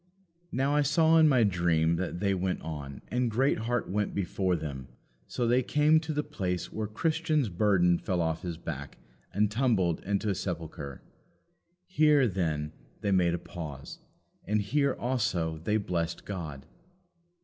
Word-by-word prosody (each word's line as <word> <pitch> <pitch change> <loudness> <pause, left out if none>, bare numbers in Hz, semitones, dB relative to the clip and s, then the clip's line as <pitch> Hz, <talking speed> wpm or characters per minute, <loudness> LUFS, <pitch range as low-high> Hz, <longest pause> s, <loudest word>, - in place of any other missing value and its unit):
Now 135 +3 +1
I 150 - +4
saw 160 +3 +4
in 155 -1 +6
my 125 -4 +4
dream 85 -4 +2
that 90 0 -3
they 100 -1 +2
went 95 0 -2
on, 70 -4 -6
and 125 0 0
Greatheart 120 0 0
went 105 +2 -1
before 95 -1 0
them, 70 -5 -5 0.4
so 120 - -2
they 125 +2 +4
came 150 +4 +4
to 160 0 -5
the 150 0 -1
place 95 -12 -3
where 110 -1 -2
Christian's 155 +2 0
burden 90 -2 +3
fell 90 -2 -1
off 80 -1 0
his 85 -3 -4
back 70 -4 -7 0.3
and 105 +1 +1
tumbled 105 -9 +1
into 100 +2 -1
a - - +1
sepulchre. 80 -7 -5 0.8
Here, 150 -7 +4
then, 80 -6 -1 0.3
they 100 - 0
made 90 -2 +3
a - - -2
pause, 80 -6 -8 0.4
and 105 0 0
here 140 +6 +1
also 105 -11 -1
they 105 +7 0
blessed 90 -4 -2
God. 75 -8 -6
95 Hz, 155 wpm, -29 LUFS, 85-125 Hz, 0.8 s, in